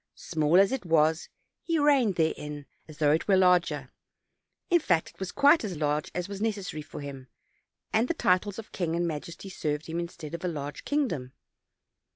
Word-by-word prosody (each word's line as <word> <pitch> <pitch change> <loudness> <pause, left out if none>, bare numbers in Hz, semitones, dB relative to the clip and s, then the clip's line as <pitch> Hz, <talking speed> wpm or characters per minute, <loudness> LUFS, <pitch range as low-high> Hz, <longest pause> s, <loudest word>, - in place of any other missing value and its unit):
Small 160 +2 +2
as 195 +3 +5
it 265 -4 -2
was, 160 -1 +2 0.3
he 330 -1 0
reigned 280 - +3
therein, 150 -3 -2 0.2
as 155 -1 -12
though 150 -2 +3
it 155 - +1
were 195 -2 +5
larger; 170 -7 +3 0.8
in 345 - +6
fact, 175 - +1
it - - -29
was 190 -2 -4
quite 285 +2 +5
as 190 -6 -4
large 150 0 0
as 180 -1 -2
was 200 0 -7
neces 210 -4 -2
sary 155 - -6
for 150 - -9
him, 135 -2 -8 0.7
and 225 +3 +3
the 340 - -1
titles 185 - +1
of 225 - -9
king 170 -3 -2
and 170 0 0
majesty 170 +4 -6
served 150 -5 -3
him 165 +1 -3
instead 170 -3 -7
of 170 - -5
a - - 0
large 145 -3 -5
kingdom. 170 - -1
170 Hz, 190 wpm, -28 LUFS, 150-200 Hz, 0.8 s, in